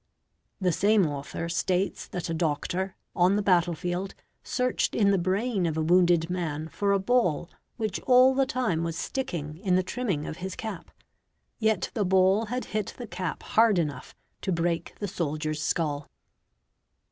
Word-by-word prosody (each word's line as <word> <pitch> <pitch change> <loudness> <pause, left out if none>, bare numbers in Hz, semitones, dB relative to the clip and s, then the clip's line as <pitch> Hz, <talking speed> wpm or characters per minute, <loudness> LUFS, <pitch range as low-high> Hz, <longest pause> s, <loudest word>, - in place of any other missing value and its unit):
The 185 -2 +2
same 200 +3 +3
author 145 +2 -4
states 180 +3 -1
that 180 0 -4
a 165 - -2
doctor, 175 +4 -1 0.2
on 180 +2 +4
the 205 - +1
battle 175 -3 +3
field, 180 +4 -3 0.3
searched 250 -1 0
in 200 -2 +4
the 195 - +3
brain 190 +2 0
of 160 -1 -2
a - - +1
wounded 175 0 +4
man 160 -3 -3
for 200 +3 0
a 200 - +4
ball 195 -6 +1 0.3
which 215 -4 -2
all 255 +1 +7
the 270 0 +2
time 225 -11 0
was 165 -1 -3
sticking 160 - -4
in 190 -2 +1
the 185 - +3
trimming 190 -9 -2
of 160 - -6
his 190 +1 -5
cap; 220 -6 -6 0.7
yet 220 -1 +1
the 215 - 0
ball 190 +3 +3
had 250 +3 -3
hit 215 -2 -2
he 245 - -6
cap 185 -5 -4
hard 220 -3 +4
enough 145 -6 -3 0.3
to 190 - -2
break 170 -1 -1
the 205 - -3
soldier's 155 -3 -2
skull. 150 -2 -1
185 Hz, 170 wpm, -27 LUFS, 165-210 Hz, 0.7 s, all